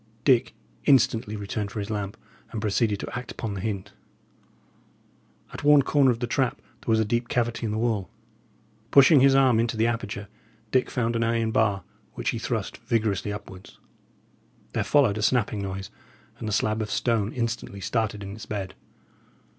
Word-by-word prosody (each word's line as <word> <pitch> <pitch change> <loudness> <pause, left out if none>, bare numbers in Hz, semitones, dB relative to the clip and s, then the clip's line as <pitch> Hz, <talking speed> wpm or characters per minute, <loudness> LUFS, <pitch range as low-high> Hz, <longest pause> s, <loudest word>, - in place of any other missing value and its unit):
Dick 125 -5 +3 0.3
instantly 115 -6 +3
returned 100 0 -3
for 105 - -9
his 105 +1 -3
lamp, 105 -2 -3 0.3
and 110 - -4
proceeded 105 0 +1
to - - -6
act 120 -1 -5
upon 110 -3 -4
the 95 - -5
hint. 100 -2 -4 1.6
At - - -7
one 145 -1 +6
corner 140 -1 +4
of 120 - +2
the - - +1
trap 130 +1 0
there - - -25
was 110 - +4
a 110 - +2
deep 120 +3 -1
cavity 120 -1 0
in - - -2
the 110 - -2
wall. 110 -4 0 0.8
Pushing 140 +3 +7
his 135 +1 +5
arm 130 -4 +5
into 115 -1 0
the 110 - +3
aperture, 105 -3 -3 0.4
Dick 130 -1 +2
found 115 -1 -1
an 115 - +1
iron 115 -1 +1
bar, 100 -5 +1 0.3
which - - -2
he - - -4
thrust - - -3
vigorously 110 -4 -1
upwards. 95 -2 -9 1.0
There - - 0
followed 125 -8 +3
a - - -2
snapping 110 -2 +1
noise, 95 0 -5 0.5
and 110 - -5
the - - -2
slab 110 +1 +1
of 105 - -3
stone 115 -3 0
instantly 115 -4 -3
started 105 0 -1
in 100 0 -6
its 110 - -9
bed. 100 -3 -4
110 Hz, 180 wpm, -26 LUFS, 105-120 Hz, 1.6 s, Pushing